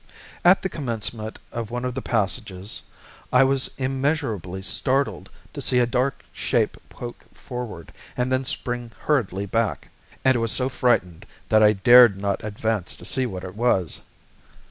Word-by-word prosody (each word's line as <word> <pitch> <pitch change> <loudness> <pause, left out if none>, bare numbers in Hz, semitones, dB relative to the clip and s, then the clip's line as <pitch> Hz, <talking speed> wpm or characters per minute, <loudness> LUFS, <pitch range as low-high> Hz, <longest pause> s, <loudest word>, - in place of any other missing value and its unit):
At 180 +2 +6
the - - +1
commencement 115 - -4
of 115 -2 -4
one 125 +1 -3
of 125 - -2
the 135 - -4
passages 105 -3 -1 0.5
I - - +6
was 135 0 +2
immeasurably 130 - -1
startled 130 -1 0 0.2
to - - -5
see 125 - +2
a 125 - +5
dark 130 +3 -1
shape - - 0
poke 120 -1 -9
forward, 120 -9 -7 0.2
and 125 +1 0
then 130 0 +2
spring 120 -2 -3
hurriedly 100 - 0
back, 115 +2 -1 0.4
and 130 -3 +4
was 115 -1 +1
so 130 0 +1
frightened 105 -7 0 0.2
that 110 0 +5
I 105 0 +6
dared 120 +1 +7
not 100 0 -2
advance 105 -2 -2
to - - -12
see 130 -1 0
what 95 -5 -6
it 90 - -7
was. 105 - +1
120 Hz, 155 wpm, -24 LUFS, 100-130 Hz, 0.5 s, dared